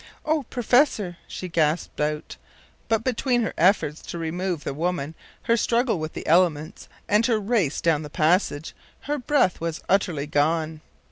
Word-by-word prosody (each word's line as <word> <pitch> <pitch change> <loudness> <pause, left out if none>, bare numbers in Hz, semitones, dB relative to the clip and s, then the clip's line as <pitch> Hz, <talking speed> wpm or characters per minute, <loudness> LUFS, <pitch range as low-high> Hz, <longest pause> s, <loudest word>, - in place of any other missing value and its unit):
“O 310 0 +1
professor!” 245 - +2
she 185 - -6
gasped 160 -2 0
out; 150 0 -2 0.5
but, 225 -1 +1
between 245 -1 +1
her - - -2
efforts 165 -4 +2
to - - -7
remove 170 0 -3
the - - -3
woman, 165 0 -2 0.3
her 230 - +3
struggle 235 -2 +1
with 155 0 -5
the - - -7
elements, 165 0 +1 0.2
and 210 +2 +3
her 225 -3 +2
race 200 - 0
down 160 -3 +2
the 150 - -7
passage, 160 -1 +1 0.3
her 295 +1 -2
breath 250 - +1
was 165 -1 -3
utterly 175 -7 +1
gone. 155 +1 0
175 Hz, 155 wpm, -24 LUFS, 155-225 Hz, 0.5 s, her